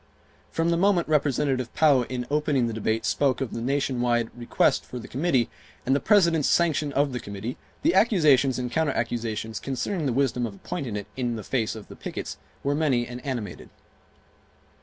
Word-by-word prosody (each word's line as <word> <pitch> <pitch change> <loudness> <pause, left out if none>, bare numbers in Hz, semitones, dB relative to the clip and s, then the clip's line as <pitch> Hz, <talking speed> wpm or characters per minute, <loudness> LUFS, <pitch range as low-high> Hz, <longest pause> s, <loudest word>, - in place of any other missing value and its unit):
From 165 +1 0
the 170 - +2
moment 190 -1 +3
Representative 140 -4 +1
Pou 140 -6 +4
in 125 -1 -3
opening 150 -4 +2
the 115 - -2
debate 110 0 -1
spoke 135 -3 +1
of 135 -4 -3
the 115 - -4
nation 135 0 0
wide 120 -2 +1
request 120 -1 +1
for 125 - -8
the 120 - -8
committee, 135 -4 +1 0.4
and 135 - +3
the - - +2
President's 170 -8 +4
sanction 155 -4 +2
of 140 -1 +1
the 125 - -2
committee, 100 +4 -6 0.3
the 325 +4 +4
accusations 150 - +4
and 125 -1 -3
counter 160 -4 +1
accusations 110 -2 -2
concerning 145 +5 -2
the - - +1
wisdom 125 -2 +1
of 100 - -9
appointing 115 +2 -5
it 100 -1 -4
in 120 -2 -1
the 110 - -6
face 115 0 -1
of 110 -2 -9
the - - -11
pickets - - -6 0.3
were 140 - +1
many 140 -6 +1
and 120 +1 -8
animated. 120 -9 -5
130 Hz, 185 wpm, -26 LUFS, 120-150 Hz, 0.4 s, Pou